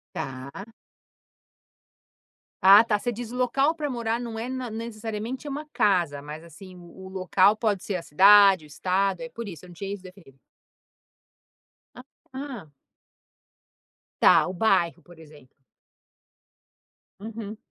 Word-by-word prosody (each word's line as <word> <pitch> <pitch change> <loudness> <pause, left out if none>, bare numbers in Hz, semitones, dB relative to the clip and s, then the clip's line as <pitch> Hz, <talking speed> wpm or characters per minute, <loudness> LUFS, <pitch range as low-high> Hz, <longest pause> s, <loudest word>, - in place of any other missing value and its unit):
Tá. 135 - -7 2.0
Ah, 200 +3 +9
tá, 220 -2 0
você 245 +4 -3
diz 235 0 -7
o - - -7
local 270 +5 +1
para 300 -2 -3
morar 235 -3 -2
não 235 -2 -6
é 240 +3 -5
na 255 -3 -5
necessariamente 225 +3 -6
uma 295 +2 -5
casa, 170 -9 +1
mas 150 +2 -9
assim 180 +3 -13
o 175 -1 -15
o - - -10
local 190 +2 +3
pode 210 -4 -1
ser 200 - -3
a 180 - -3
cidade, 195 +1 +6
o - - -15
estado. 185 +6 -1
É 245 - -6
por 235 -2 -8
isso 175 -2 -10
eu - - -15
não - - -12
tinha 195 +2 -5
isso 205 - -8
definido. 180 -8 -15 1.6
A 250 - -11 0.3
ah. 260 - -7 1.5
Tá, - - +6
o 185 - -5
bairro, 175 -4 +1
por 175 -1 -17
exemplo. 150 -4 -17 1.7
Uhum. 220 0 -7
200 Hz, 140 wpm, -25 LUFS, 175-230 Hz, 2.0 s, Ah